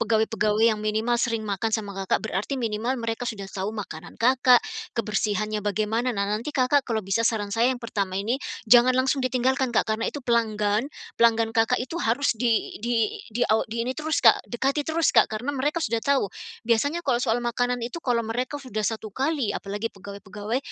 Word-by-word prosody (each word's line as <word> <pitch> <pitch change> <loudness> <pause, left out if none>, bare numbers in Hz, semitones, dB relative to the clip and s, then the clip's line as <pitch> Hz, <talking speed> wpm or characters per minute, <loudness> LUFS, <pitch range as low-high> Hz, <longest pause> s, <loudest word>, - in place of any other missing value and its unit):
pegawai-pegawai 220 -1 +1
yang 220 -2 +3
minimal 220 +3 0
sering 230 -2 -1
makan 215 +2 0
sama 205 -2 -6 0.2
Kakak, - - +1
berarti 215 +8 -2
minimal 230 +2 -1
mereka 230 +1 -3
sudah 205 -4 -5
tahu 195 +1 -3
makanan 180 -6 -7
Kakak, 250 0 +4 0.3
kebersihannya 215 -1 -1
bagaimana. 215 +4 -1
Nah, 200 - +1
nanti 220 +9 -3
Kakak 260 +2 +2
kalau 220 -4 -1
bisa 195 +4 0
saran 210 -3 0
saya 230 +2 +3
yang 260 - 0
pertama 195 -4 -2
ini, 230 +7 -1 0.2
jangan 245 +2 +6
langsung 265 +1 +2
ditinggalkan, 260 +1 +1
Kak, - - +4
karena 225 +1 -1
itu 285 -4 -7
pelanggan, 220 0 +1 0.3
pelanggan 230 -1 +4
Kakak 225 -1 +2
itu 335 +6 -5
harus 245 +4 +1
di 230 -1 0
di 230 -3 0 0.2
di 245 - 0
aw 220 - +2
di 230 +1 -3
ini 250 - -2
terus, 315 +1 -1
Kak, - - +5
dekati 275 +4 -1
terus, 320 0 +2
Kak, - - +5
karena 225 +6 -3
mereka 295 +4 -1
sudah 230 0 0
tahu. 265 -6 +1 0.3
Biasanya 285 +9 +1
kalau 255 -5 +1
soal 240 -1 0
makanan 245 0 -1
itu 245 +8 -4
kalau 245 -6 0
mereka 245 +5 -3
sudah 215 -5 -3
satu 220 -1 -3
kali, 270 +1 -1
apalagi 205 +3 -4
pegawai-pegawai 200 +3 -5
230 Hz, 185 wpm, -25 LUFS, 215-255 Hz, 0.3 s, jangan